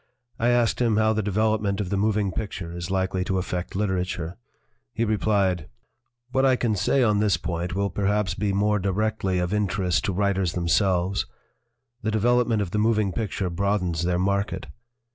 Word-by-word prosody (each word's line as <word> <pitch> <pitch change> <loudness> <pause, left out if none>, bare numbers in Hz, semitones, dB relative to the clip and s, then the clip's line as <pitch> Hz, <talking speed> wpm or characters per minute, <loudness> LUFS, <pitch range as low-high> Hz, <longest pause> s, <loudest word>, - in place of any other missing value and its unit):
I 115 - +2
asked 120 -1 +2
him 115 -3 +2
how 110 0 +3
the 110 - 0
development 105 0 0
of 100 -4 -3
the - - +1
moving 105 -1 +1
picture 95 -5 -5
is 85 0 -5
likely 95 -1 0
to 95 - 0
affect 90 -1 -3
literature. 90 -3 -2 0.6
He 115 - +1
replied: 100 -6 +1 0.6
"What 130 +1 +2
I 130 -1 +5
can 115 -3 0
say 115 +7 +2
on 105 -3 +3
this 105 -4 +2
point 85 +1 -3
will 100 0 0
perhaps 100 0 0
be 100 +2 -1
more 105 +2 +2
directly 100 0 0
of 90 +2 -1
interest 95 -3 0
to - - 0
writers 95 -2 0
themselves; 90 +2 +1 0.7
the 110 - -1
development 115 0 +2
of 90 - -6
the 105 - 0
moving 110 -2 +2
picture 100 -3 -2
broadens 90 -3 0
their 90 0 +1
market. 100 0 -1
100 Hz, 170 wpm, -25 LUFS, 90-110 Hz, 0.7 s, I